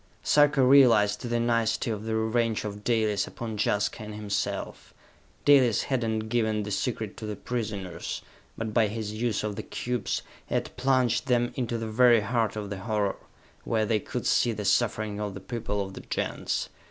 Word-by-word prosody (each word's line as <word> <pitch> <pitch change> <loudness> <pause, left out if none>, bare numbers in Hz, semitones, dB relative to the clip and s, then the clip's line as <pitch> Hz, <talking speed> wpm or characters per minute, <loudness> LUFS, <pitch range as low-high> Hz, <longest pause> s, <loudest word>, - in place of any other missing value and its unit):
Sarka 145 -2 +4
realized 120 -6 +5
the 120 -1 -1
nicety 115 0 +1
of 105 0 -4
the 110 0 -1
revenge 110 0 0
of 105 0 -6
Dalis 110 -4 +1
upon 115 -2 -6
Jaska 105 +2 0
and 105 -1 -7
himself. 105 -2 -4 0.5
Dalis 130 -6 +5
had 130 -3 -1
not 110 -1 -1
given 110 -2 0
the 105 - -5
secret 110 -1 -2
to 110 - -6
the 105 - -3
prisoners, 105 -5 -4 0.3
but 110 -1 -4
by 115 -2 +4
his 105 0 -4
use 110 -1 -1
of 105 -2 -3
the - - -2
cubes, 120 -1 -3 0.2
he - - -2
had - - -2
plunged 130 -1 +2
them 120 -1 +2
into 120 -3 -2
the 115 - -4
very 120 +1 +5
heart 110 0 0
of 105 -2 -5
the 100 - -4
horror, 105 -1 -1 0.5
where 110 -1 +1
they 110 0 +1
could - - -5
see 120 - +3
the 105 -1 -5
suffering 110 -2 +1
of 105 -2 -3
the - - -6
people 105 -1 -3
of 95 - -9
the - - -8
Gens. - - -2
110 Hz, 185 wpm, -27 LUFS, 105-120 Hz, 0.5 s, realized